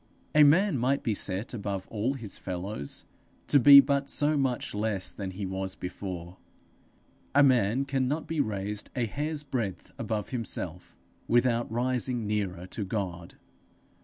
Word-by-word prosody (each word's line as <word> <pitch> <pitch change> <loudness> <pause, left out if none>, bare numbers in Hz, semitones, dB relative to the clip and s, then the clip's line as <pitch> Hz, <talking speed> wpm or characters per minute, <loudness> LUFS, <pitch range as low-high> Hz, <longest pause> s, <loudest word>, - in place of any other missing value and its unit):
A 150 - +6
man 160 +1 +4
might 135 +4 +1
be 115 - +1
set 100 +3 -3
above 100 -4 -4
all 115 +5 -1
his 115 -7 -4
fellows, 90 -4 -5 0.4
to 145 - +4
be 140 +3 +10
but 140 0 +2
so 150 +1 +2
much 135 -4 -1
less 105 -3 -1
than 100 -2 -5
he 95 +2 -5
was 95 0 -4
before; 90 -1 -6 1.0
a 145 - +7
man 125 -1 +3
cannot 135 +3 -1
be 165 -1 -3
raised 105 -1 -3
a 125 - +1
hair's 150 +6 -3
breadth 120 -9 -4
above 110 -2 -3
himself, 95 -8 -4 0.3
without 120 -1 +2
rising 125 0 0
nearer 100 -4 -2
to 100 +3 -4
God. 95 -4 -4
110 Hz, 145 wpm, -28 LUFS, 95-135 Hz, 1.0 s, be